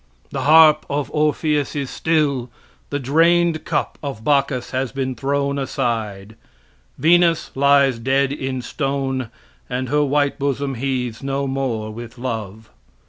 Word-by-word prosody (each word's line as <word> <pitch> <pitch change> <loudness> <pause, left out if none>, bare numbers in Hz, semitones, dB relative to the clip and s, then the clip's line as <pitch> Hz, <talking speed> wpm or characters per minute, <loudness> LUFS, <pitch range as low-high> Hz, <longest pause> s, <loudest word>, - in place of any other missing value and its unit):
The 135 - -3
harp 155 +1 +6
of 145 0 -2
Orpheus 150 -1 0
is 140 -3 -3
still; 145 -6 0 0.4
the 145 - -1
drained 165 +4 +2
cup - - -2
of 135 -7 -6
Bacchus 140 -2 +1
has 130 -1 -2
been 130 -1 -2
thrown 140 +3 -1
aside; 110 -6 -3 0.6
Venus 170 0 +3
lies 140 -2 +3
dead 135 +3 +1
in 130 -3 -4
stone, 135 -2 -2 0.4
and 125 0 -3
her 150 +1 +2
white 145 0 +1
bosom 140 0 -1
heaves 125 -2 -3
no 140 0 -2
more 130 -5 -2
with 120 +2 -9
love. 110 -3 -5
135 Hz, 135 wpm, -20 LUFS, 125-145 Hz, 0.6 s, harp